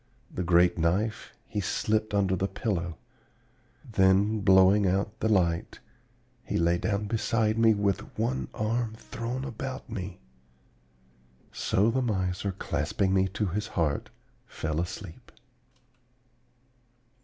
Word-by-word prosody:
The -, -, -3 dB
great 90 Hz, 0 st, +4 dB
knife 95 Hz, +7 st, 0 dB
he 105 Hz, -, -3 dB
slipped 110 Hz, +3 st, 0 dB
under 95 Hz, -2 st, +2 dB
the 95 Hz, +2 st, 0 dB
pillow. 85 Hz, -7 st, -3 dB, 0.9 s
Then, 100 Hz, +2 st, +3 dB
blowing 95 Hz, +1 st, +5 dB
out 100 Hz, +3 st, -1 dB
the 110 Hz, -, 0 dB
light, 85 Hz, -5 st, +1 dB, 0.6 s
he -, -, -2 dB
lay 85 Hz, +1 st, +2 dB
down 105 Hz, 0 st, -1 dB
beside 110 Hz, 0 st, +1 dB
me 115 Hz, -1 st, +5 dB
with 100 Hz, -2 st, -1 dB
one 120 Hz, +4 st, -1 dB
arm 110 Hz, +1 st, -1 dB
thrown 120 Hz, +4 st, -5 dB
about 130 Hz, +1 st, -6 dB
me. 95 Hz, -4 st, -5 dB, 1.3 s
So 105 Hz, +4 st, +1 dB
the 130 Hz, +3 st, 0 dB
miser, 95 Hz, -4 st, -1 dB
clasping 90 Hz, +3 st, -1 dB
me 95 Hz, 0 st, +3 dB
to 105 Hz, +3 st, -2 dB
his 105 Hz, +3 st, -2 dB
heart, 75 Hz, -4 st, 0 dB, 0.4 s
fell 80 Hz, +1 st, -2 dB
asleep. 95 Hz, +6 st, -7 dB
100 Hz, 120 wpm, -28 LUFS, 90-110 Hz, 1.3 s, blowing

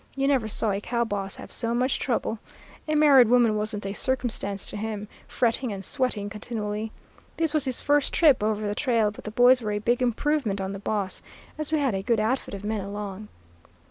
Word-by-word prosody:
You 275 Hz, 0 st, 0 dB
never 265 Hz, -6 st, +2 dB
saw 220 Hz, 0 st, +1 dB
a 200 Hz, +1 st, -2 dB
cow 235 Hz, +2 st, -1 dB
boss 200 Hz, -3 st, -3 dB
have -, -, -10 dB
so 230 Hz, 0 st, -1 dB
much 255 Hz, +2 st, +1 dB
trouble; 230 Hz, -3 st, -1 dB, 0.5 s
a 305 Hz, -, 0 dB
married 285 Hz, -5 st, +6 dB
woman 235 Hz, -2 st, +4 dB
wasn't 210 Hz, -1 st, -2 dB
a 195 Hz, -, -3 dB
circumstance 230 Hz, -5 st, 0 dB
to -, -, -3 dB
him, 210 Hz, 0 st, -4 dB, 0.2 s
fretting 240 Hz, 0 st, 0 dB
and 195 Hz, -1 st, -5 dB
sweating 225 Hz, -6 st, -1 dB
continually. 210 Hz, 0 st, -4 dB, 0.5 s
This 325 Hz, -2 st, +1 dB
was 305 Hz, -3 st, +3 dB
his 260 Hz, -2 st, 0 dB
first 290 Hz, -1 st, +2 dB
trip 295 Hz, -9 st, +4 dB
over 215 Hz, 0 st, -1 dB
the 205 Hz, -, -1 dB
trail, 230 Hz, -4 st, +1 dB
but 210 Hz, -, -13 dB
the -, -, -3 dB
boys 245 Hz, +3 st, +5 dB
were 210 Hz, -2 st, -2 dB
a -, -, -1 dB
big 235 Hz, +4 st, 0 dB
improvement 250 Hz, -3 st, 0 dB
on 190 Hz, 0 st, -3 dB
the 195 Hz, -, -6 dB
boss, 200 Hz, -2 st, -2 dB, 0.3 s
as 305 Hz, 0 st, -4 dB
we 315 Hz, -, +2 dB
had 275 Hz, -6 st, +1 dB
a 195 Hz, -, -2 dB
good 225 Hz, +3 st, +1 dB
outfit 220 Hz, 0 st, -1 dB
of 195 Hz, -, -9 dB
men 210 Hz, 0 st, -2 dB
along. 205 Hz, +1 st, -6 dB
220 Hz, 210 wpm, -25 LUFS, 205-255 Hz, 0.5 s, married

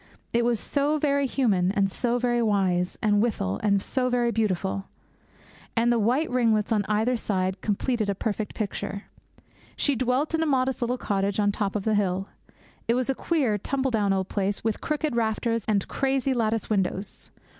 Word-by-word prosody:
It 235 Hz, 0 st, +3 dB
was 235 Hz, -2 st, +1 dB
so 290 Hz, +5 st, 0 dB
very 280 Hz, -2 st, +1 dB
human, 200 Hz, -9 st, +2 dB
and 195 Hz, -1 st, +1 dB
so 240 Hz, +4 st, 0 dB
very 240 Hz, -1 st, +1 dB
wise, 190 Hz, -5 st, +1 dB
and 205 Hz, -1 st, +3 dB
withal 100 Hz, -, -1 dB, 0.2 s
so 255 Hz, +4 st, 0 dB
very 240 Hz, -1 st, +1 dB
beautiful; 195 Hz, -3 st, -1 dB, 0.9 s
and 235 Hz, +1 st, +3 dB
the 235 Hz, -, +2 dB
white 250 Hz, +9 st, +2 dB
ringlets 230 Hz, -4 st, +2 dB
on 210 Hz, -2 st, +2 dB
either 220 Hz, +4 st, +2 dB
side 190 Hz, -4 st, -1 dB
completed 215 Hz, +1 st, 0 dB
a 200 Hz, -, 0 dB
perfect 215 Hz, +1 st, -3 dB
picture. 200 Hz, -1 st, -4 dB, 0.7 s
She 285 Hz, -, +1 dB
dwelt 255 Hz, +5 st, 0 dB
in 325 Hz, -, +1 dB
a 320 Hz, -, +1 dB
modest 265 Hz, -2 st, +1 dB
little 245 Hz, +1 st, 0 dB
cottage 200 Hz, -2 st, -1 dB
on 205 Hz, -1 st, +3 dB
top 200 Hz, 0 st, -2 dB
of 205 Hz, -, -1 dB
the 220 Hz, -, +1 dB
hill. 195 Hz, -2 st, 0 dB, 0.6 s
It 230 Hz, -, +3 dB
was 255 Hz, +1 st, +1 dB
a -, -, 0 dB
queer, 265 Hz, -8 st, 0 dB
tumble 265 Hz, +5 st, -1 dB
down 210 Hz, -3 st, +1 dB
old 190 Hz, -1 st, 0 dB
place 200 Hz, 0 st, -2 dB
with 220 Hz, -1 st, -1 dB
crooked 300 Hz, -3 st, -1 dB
rafters 230 Hz, 0 st, 0 dB
and 205 Hz, -3 st, +1 dB
crazy 270 Hz, -1 st, 0 dB
lattice 225 Hz, -2 st, 0 dB
windows. 195 Hz, -1 st, -2 dB
225 Hz, 175 wpm, -26 LUFS, 200-250 Hz, 0.9 s, It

